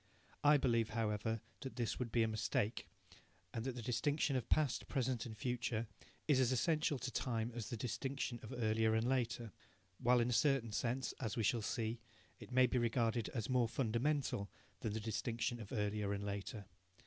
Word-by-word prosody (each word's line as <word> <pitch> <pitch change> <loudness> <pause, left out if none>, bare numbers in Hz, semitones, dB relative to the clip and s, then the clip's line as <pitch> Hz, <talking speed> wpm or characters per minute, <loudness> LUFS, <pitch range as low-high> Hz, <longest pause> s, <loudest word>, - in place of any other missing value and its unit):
I 145 0 +7
believe, 115 -5 +2
however, 110 -1 -1 0.2
that 135 - -6
this 120 -3 -1
would 120 -3 -2
be 115 0 +4
a - - +2
mistake, 110 -3 -1 0.7
and 115 - -2
that 130 -2 -2
the 120 - -5
distinction 135 +4 +1
of 125 -2 -1
past, 150 -5 +2
present 130 -4 0
and 110 -1 -8
future 120 -1 -1 0.4
is 145 -4 +5
as 130 -1 +4
essential 150 +3 +2
to 130 - -4
time 115 -2 -1
as 115 -3 -4
the 120 - -3
distinction 125 +2 -2
of 110 - -9
earlier 110 -1 +2
and 110 +2 +2
later, 120 -3 0 0.5
while 125 +1 +4
in 120 +1 +2
a - - +2
certain 135 -3 +3
sense, 125 +4 -1
as 115 -4 -2
we 115 - +1
shall 115 +2 +2
see, 115 +1 -2 0.4
it - - -10
may 130 0 +6
be 125 +1 +1
regarded 115 -1 +1
as 115 -2 -1
more 125 -3 +3
fundamental 120 -2 0 0.3
than 105 - -2
the 110 - -1
distinction 115 +2 -2
of 105 -2 -8
earlier 105 -3 0
and 100 0 -3
later. 100 +1 -4
120 Hz, 185 wpm, -38 LUFS, 110-130 Hz, 0.7 s, I